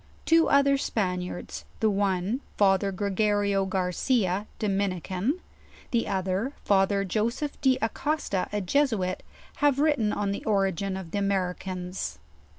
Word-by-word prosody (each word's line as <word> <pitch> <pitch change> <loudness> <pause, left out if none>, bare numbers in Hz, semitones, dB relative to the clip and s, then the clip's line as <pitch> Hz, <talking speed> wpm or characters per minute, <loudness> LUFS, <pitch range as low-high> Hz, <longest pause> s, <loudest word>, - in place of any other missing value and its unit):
Two 330 0 +4
other 280 0 +4
Span 185 -8 -1
iards, 180 0 -6 0.2
the 220 - +3
one 200 +4 0 0.2
Father 195 -1 +3
Gregorio 200 0 +1
Garcia, 190 +2 0
Dominican; 195 - -1 0.5
the 235 -3 +1
other 190 +7 -1
Father 195 0 +3
Joseph 235 - -2
De 265 -2 +4
Acosta, 230 -5 -1
a 210 - -1
Jesuit, 200 -4 +1 0.4
have 290 -2 +3
written 285 -8 +2
on 205 -1 -1
the 200 - -4
ori 195 -3 +2
gin 190 +1 -3
of 180 -4 -8
the 205 - -1
Americans. 185 - -2
200 Hz, 130 wpm, -27 LUFS, 190-230 Hz, 0.5 s, Two